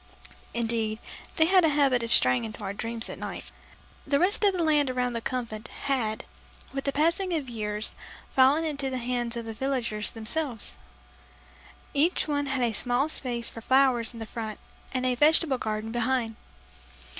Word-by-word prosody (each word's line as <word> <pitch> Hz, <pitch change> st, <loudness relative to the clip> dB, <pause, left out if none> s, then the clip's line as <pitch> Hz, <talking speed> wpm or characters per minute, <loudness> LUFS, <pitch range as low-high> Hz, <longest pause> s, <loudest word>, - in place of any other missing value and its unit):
(Indeed, 225 Hz, -2 st, -1 dB, 0.4 s
they 320 Hz, -, +5 dB
had 370 Hz, +1 st, +5 dB
a 320 Hz, -, +5 dB
habit 280 Hz, -4 st, +3 dB
of 230 Hz, 0 st, -4 dB
straying 125 Hz, -, +5 dB
into 215 Hz, -1 st, -7 dB
our 195 Hz, 0 st, -3 dB
dreams 230 Hz, +2 st, -4 dB
at -, -, -7 dB
night.) -, -, -6 dB, 0.6 s
The 280 Hz, -, +3 dB
rest 375 Hz, +7 st, +2 dB
of 405 Hz, -, +6 dB
the 355 Hz, -2 st, 0 dB
land 300 Hz, -3 st, +3 dB
around 250 Hz, -1 st, -1 dB
the 230 Hz, -, -3 dB
Convent 235 Hz, -3 st, -4 dB
had, 235 Hz, -6 st, -2 dB, 0.5 s
with 275 Hz, 0 st, -3 dB
the 280 Hz, -, +1 dB
passing 335 Hz, +5 st, +1 dB
of 300 Hz, -4 st, -2 dB
the 250 Hz, -, -9 dB
years, 210 Hz, -1 st, -3 dB, 0.3 s
fallen 270 Hz, +5 st, +4 dB
into 280 Hz, -3 st, -2 dB
the 260 Hz, -, -3 dB
hands 240 Hz, -1 st, -2 dB
of 235 Hz, -, -5 dB
the 225 Hz, -, -5 dB
villagers 235 Hz, -4 st, -1 dB
themselves. 235 Hz, -, -1 dB, 1.2 s
Each 315 Hz, +5 st, +2 dB
one 285 Hz, -1 st, 0 dB
had 265 Hz, -2 st, 0 dB
a 235 Hz, -2 st, +1 dB
small 245 Hz, +7 st, +1 dB
space 240 Hz, -6 st, -2 dB
for 230 Hz, -, -6 dB
flowers 260 Hz, -2 st, +3 dB
in 225 Hz, -1 st, -6 dB
front 220 Hz, -1 st, -5 dB, 0.3 s
and 255 Hz, -1 st, -1 dB
a 255 Hz, -, +2 dB
vegetable 295 Hz, 0 st, +4 dB
garden 215 Hz, 0 st, -3 dB
behind. 240 Hz, -1 st, 0 dB
250 Hz, 175 wpm, -27 LUFS, 225-280 Hz, 1.2 s, of